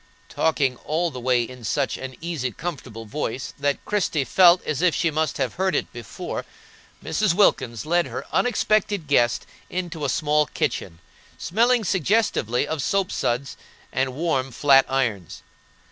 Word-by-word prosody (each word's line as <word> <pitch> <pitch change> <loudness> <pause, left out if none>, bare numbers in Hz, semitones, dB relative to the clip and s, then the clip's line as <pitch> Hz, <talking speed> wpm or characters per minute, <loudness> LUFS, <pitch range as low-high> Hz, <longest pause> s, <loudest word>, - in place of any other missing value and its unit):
Talking 140 -6 +1
all 165 +5 -1
the 130 - -7
way 125 -1 +2
in 125 +1 -10
such 135 +5 0
an 130 -1 -7
easy, 160 -7 -3
comfortable 130 -7 -6
voice 130 +2 -4
that 140 0 -1
Christie 185 -8 0
felt 175 +4 +5
as 150 -1 -2
if 180 -3 +3
she 165 -2 +1
must 155 0 -1
have - - -1
heard 190 +1 0
it - - -2
before, - - -6 0.6
Mrs. 210 -5 +1
Wilkins 125 - +2
led 175 +2 +2
her - - -6
unexpected 210 -6 +1
guest 120 -5 +2 0.2
into 175 -3 -4
a 140 - 0
small 150 +2 +2
kitchen, 85 - -3 0.4
smelling 235 +4 +2
suggestively 185 - +1
of 160 -2 -2
soap 195 +5 0
suds 125 +3 -2 0.4
and 130 -1 -1
warm 145 -4 0
flat 135 +1 +4
irons. 115 -10 -2
150 Hz, 150 wpm, -23 LUFS, 130-175 Hz, 0.6 s, felt